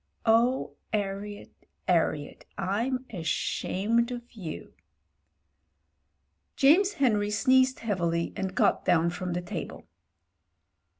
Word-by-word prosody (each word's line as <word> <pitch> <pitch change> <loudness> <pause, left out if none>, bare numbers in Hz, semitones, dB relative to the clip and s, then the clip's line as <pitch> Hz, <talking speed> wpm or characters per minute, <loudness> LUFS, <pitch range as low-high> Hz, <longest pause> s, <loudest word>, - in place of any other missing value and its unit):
Oh! 235 +3 +2
'Arriet, 205 0 -3 0.4
'Arriet 160 -4 0
— - - -38 0.2
I'm 255 +2 -1
ashamed 200 +6 0
of 240 -1 -7
you." 185 -9 -8 1.8
James 365 +9 +5
Henry 215 - +2
sneezed 260 +4 +3
heavily 170 -6 -1
and 190 -1 -3
got - - +2
down 170 -1 +3
from 180 0 -4
the 175 - -2
table. 175 - -6
210 Hz, 100 wpm, -28 LUFS, 180-250 Hz, 1.8 s, James